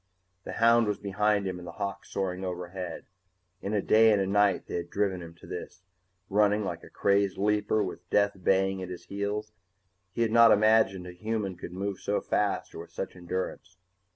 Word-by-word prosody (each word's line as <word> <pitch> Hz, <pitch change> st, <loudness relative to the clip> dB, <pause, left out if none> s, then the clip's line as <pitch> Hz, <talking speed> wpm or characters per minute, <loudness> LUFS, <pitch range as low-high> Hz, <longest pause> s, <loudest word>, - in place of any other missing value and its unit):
The -, -, -5 dB
hound 115 Hz, 0 st, +4 dB
was 105 Hz, -, 0 dB
behind 100 Hz, +1 st, +1 dB
him 95 Hz, -1 st, -3 dB
and 90 Hz, -, -10 dB
the 85 Hz, -, -7 dB
hawk 100 Hz, +2 st, -4 dB
soaring 95 Hz, -1 st, -3 dB
overhead. 90 Hz, 0 st, -5 dB, 0.6 s
In 100 Hz, +2 st, -2 dB
a 100 Hz, -, +1 dB
day 110 Hz, 0 st, +6 dB
and 105 Hz, -, +3 dB
a 95 Hz, -, +1 dB
night 100 Hz, 0 st, +2 dB
they -, -, -4 dB
had 85 Hz, 0 st, -5 dB
driven 95 Hz, -2 st, -1 dB
him 85 Hz, -1 st, -10 dB
to -, -, -16 dB
this, 95 Hz, -, -8 dB, 0.4 s
running 105 Hz, +1 st, +3 dB
like -, -, -4 dB
a -, -, -12 dB
crazed 100 Hz, -1 st, +1 dB
leaper 105 Hz, +1 st, +1 dB
with 90 Hz, -2 st, -7 dB
death 100 Hz, 0 st, +3 dB
baying 95 Hz, 0 st, +2 dB
at 90 Hz, -, -5 dB
his 90 Hz, -1 st, -8 dB
heels 105 Hz, +2 st, -3 dB, 0.6 s
he 115 Hz, -, 0 dB
had 115 Hz, -, 0 dB
not 115 Hz, 0 st, +7 dB
imagined 110 Hz, -3 st, +4 dB
a 90 Hz, -, -7 dB
human 105 Hz, 0 st, -3 dB
could 85 Hz, -, -8 dB
move 95 Hz, +1 st, -4 dB
so 100 Hz, -, 0 dB
fast 105 Hz, -1 st, -1 dB
or -, -, -8 dB
with 85 Hz, 0 st, -10 dB
such 90 Hz, +3 st, -5 dB
endurance. 95 Hz, +2 st, -5 dB
100 Hz, 200 wpm, -28 LUFS, 90-105 Hz, 0.6 s, not